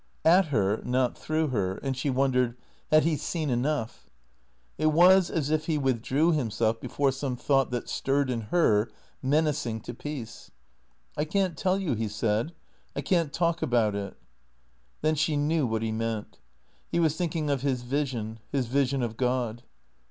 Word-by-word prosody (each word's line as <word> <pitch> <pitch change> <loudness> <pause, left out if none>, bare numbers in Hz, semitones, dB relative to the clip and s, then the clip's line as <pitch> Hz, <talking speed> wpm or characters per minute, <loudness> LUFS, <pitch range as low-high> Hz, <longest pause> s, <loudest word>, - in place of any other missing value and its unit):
At 180 +4 +6
her, 105 -8 0
not 125 0 +1
through 155 0 -1
her, 95 -6 -1
and 135 +4 -3
she 130 +3 -2
wondered, 125 -2 +1 0.3
had 155 0 +6
he 165 -1 +2
seen 155 -1 -2
enough? 120 - -2 0.7
It 155 - +2
was 175 +4 +6
as 150 -3 -1
if 155 0 0
he 160 -2 +1
withdrew 135 +4 +1
himself 115 -6 0
before 140 -1 0
some 135 -1 -3
thought 135 +1 +2
that 120 -1 -3
stirred 135 -1 0
in 115 -2 -2
her, 115 -11 +3 0.3
men 145 +4 +3
acing 145 -7 -2
to 120 - -6
peace. 125 -3 -7 0.4
" 60 0 -39
I - - +3
can't 185 +2 0
tell 185 +5 +1
you," 185 -9 -1
he 110 -1 -1
said. 110 +7 -1 0.2
" - - -38
I - - -1
can't 170 -5 +1
talk 170 +1 0
about 115 -4 +2
it." 100 -1 -5 0.9
Then 155 - +3
she 155 0 +1
knew 150 -1 +1
what 110 -1 -1
he 110 - -1
meant. 110 - -3 0.5
He 170 - +1
was 160 -2 +2
thinking 160 -3 -1
of 140 -3 0
his 130 -3 -1
vision, 120 -5 -2
his 135 -3 0
vision 135 +1 +1
of 115 -1 -3
God. 125 -2 -1
135 Hz, 175 wpm, -27 LUFS, 115-155 Hz, 0.9 s, At